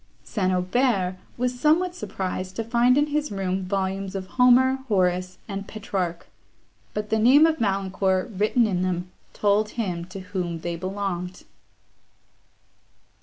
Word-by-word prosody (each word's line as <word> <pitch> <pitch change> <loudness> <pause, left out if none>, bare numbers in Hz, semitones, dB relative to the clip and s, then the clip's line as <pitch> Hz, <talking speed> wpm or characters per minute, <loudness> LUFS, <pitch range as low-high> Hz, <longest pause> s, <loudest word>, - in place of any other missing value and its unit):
St. 185 -4 -1
Aubert 185 0 +1 0.2
was 250 0 -1
somewhat 340 +6 +3
surprised 185 - -4
to 225 - -2
find 240 +3 +3
in 290 - +4
his 300 0 -2
room 190 -1 -2
volumes 195 0 -2
of 190 -1 -3
Homer, 255 +2 +5
Horace, 185 -3 +1
and 200 -1 -5
Petrarch; 185 -5 -3 0.7
but 210 +1 -3
the 220 - +3
name 265 +8 +7
of 320 -1 +1
Valancourt, 195 -1 0
written 215 +5 +3
in 185 -4 0
them, 180 0 -2 0.2
told 210 +1 +2
him 180 -7 -2
to 185 +2 -8
whom 180 -3 -4
they 170 0 -3
belonged. 185 0 -4
195 Hz, 135 wpm, -25 LUFS, 185-240 Hz, 0.7 s, name